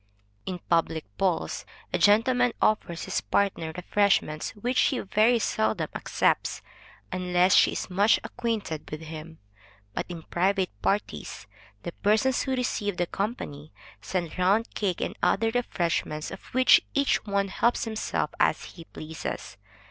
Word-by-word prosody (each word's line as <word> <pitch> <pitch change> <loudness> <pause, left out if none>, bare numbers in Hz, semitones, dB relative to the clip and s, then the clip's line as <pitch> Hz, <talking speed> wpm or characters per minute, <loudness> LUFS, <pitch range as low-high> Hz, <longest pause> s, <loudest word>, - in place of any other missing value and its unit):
In 185 -1 -2
public 165 -1 +1
balls, 180 -4 0 0.3
a - - +1
gentleman 245 +4 +4
offers 175 -6 +1
his - - -1
partner 185 -5 0
refreshments, 180 -5 +1
which 245 +5 -2
she 265 - +3
very 215 +4 +3
seldom 220 -1 0
accepts, - - 0 0.5
unless 180 0 +2
she - - +5
is - - -3
much 200 +4 +3
acquainted 215 -10 -3
with 155 +1 -6
him. 160 0 -9 0.6
But - - -3
in 170 -2 -7
private 190 +2 0
parties, 200 - -2 0.4
the 175 - -4
persons 215 +8 +2
who 265 -1 -1
receive 210 -6 -1
the 175 - +1
company, 170 - -5 0.3
send 180 -2 -3
round 200 +5 +2
cake 190 -4 -1
and - - -2
other 225 +2 +2
refreshments, 170 -9 -1
of 195 - -8
which 255 +1 +5
each 280 -1 +2
one 200 -1 0
helps 235 +5 +1
himself 220 -1 -2
as - - +2
he 165 - -11
pleases. 155 -1 -6
195 Hz, 140 wpm, -27 LUFS, 170-220 Hz, 0.6 s, she